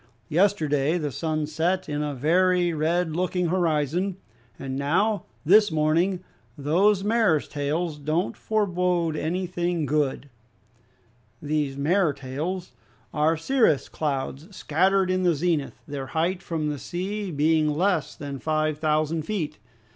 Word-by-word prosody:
Yesterday 155 -4 +2
the 150 -4 -2
sun 155 +2 -2
set 165 +5 -1
in 150 -1 -2
a 145 -1 -2
very 175 +5 +2
red 160 +1 0
looking 180 0 0
horizon, 175 +1 0 0.4
and 130 -1 -5
now, 185 +10 +1 0.2
this 205 +4 +6
morning, 165 +4 +1 0.3
those 185 +8 +2
mares 210 -8 +2
tails 150 +2 -2
don't 155 +5 -1
forbode 180 -6 0
anything 175 0 -1
good." 145 -1 0 1.1
These 145 -2 -1
mares 160 +1 +2
tails 155 +8 -4 0.4
are 155 +2 +2
cirrus 220 - +2
clouds, 145 +4 -3
scattered 185 +4 +2
in 185 0 +1
the 175 -3 +3
zenith, 160 -2 -1
their 140 -2 -5
height 170 +6 -1
from 160 -5 -2
the 145 -2 -4
sea 195 +6 -4
being 155 0 +2
less 170 +1 0
than 140 -2 -6
five 155 0 0
thousand 155 +1 +1
feet. 155 - -3
160 Hz, 125 wpm, -25 LUFS, 150-180 Hz, 1.1 s, this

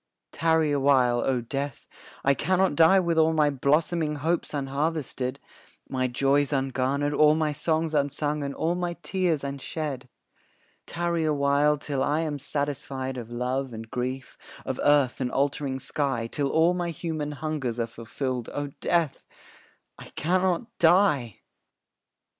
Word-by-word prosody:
Tarry 160 -2 +2
a 145 - +1
while, 130 -3 +3
O 125 0 0
Death, 135 +3 -4 0.4
I 140 - +4
cannot 185 +5 +1
die 165 +6 +6
With 170 -3 +1
all 160 0 +4
my 150 -2 +3
blossoming 150 +3 +1
hopes 165 +4 -1
unharvested, 140 -2 -2 0.5
My 130 -1 0
joys 140 +3 +1
ungarnered, 135 +1 0
all 150 +1 +5
my 155 -1 +1
songs 160 +2 0
unsung, 145 +1 0
And 140 0 -4
all 165 +2 0
my 175 -1 -2
tears 180 -6 0
unshed. 140 -1 -4 0.8
Tarry 170 -1 -1
a 155 -1 +1
while, 140 +1 +3
till 140 -2 -3
I 150 +4 +1
am 150 -3 -3
satisfied 140 -2 -3
Of 120 -3 -7
love 125 +2 -2
and 110 0 -8
grief, 130 +1 -4 0.3
of - - -3
earth 145 -3 +3
and 125 -1 -1
altering 140 -1 0
sky; 135 -2 -2
Till 140 +4 -2
all 165 +4 +3
my 175 -1 -2
human 155 -2 -4
hungers 145 -6 -3
are 115 - +1
fulfilled, 120 +2 -4
O 145 -1 -3
Death, 165 -5 0 0.7
I - - -9
cannot 185 - +1
die! 160 - +3
145 Hz, 145 wpm, -26 LUFS, 135-160 Hz, 0.8 s, die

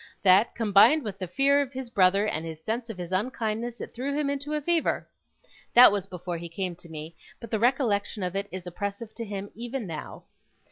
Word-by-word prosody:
that, 195 +3 +5
combined 225 +8 +5
with 205 -4 -6
his 185 -3 -5
fear 280 +7 +3
of 280 -1 -4
his 260 -2 -6
brother, 195 0 +4
and 160 -6 -2
his 160 -1 -8
sense 230 +4 -3
of 220 - -6
his 175 -1 -6
unkindness, 225 +3 -2
it - - -7
threw 275 +4 -3
him 290 -2 0
into 285 +2 -3
a - - 0
fever. 330 +2 0 0.7
That 245 -1 +10
was 200 -2 -1
before 180 -2 -5
he 170 0 -7
came 180 +1 -4
to 170 - -12
me, 160 +1 -8 0.2
but 230 - -10
the 220 - 0
recollection 230 -5 +1
of 180 +1 -3
it 200 +1 -2
is 185 0 -6
oppressive 200 +5 -5
to 230 - -6
him 200 -2 -6
even 240 +2 -5
now. 160 -4 -7
210 Hz, 215 wpm, -27 LUFS, 185-245 Hz, 0.7 s, That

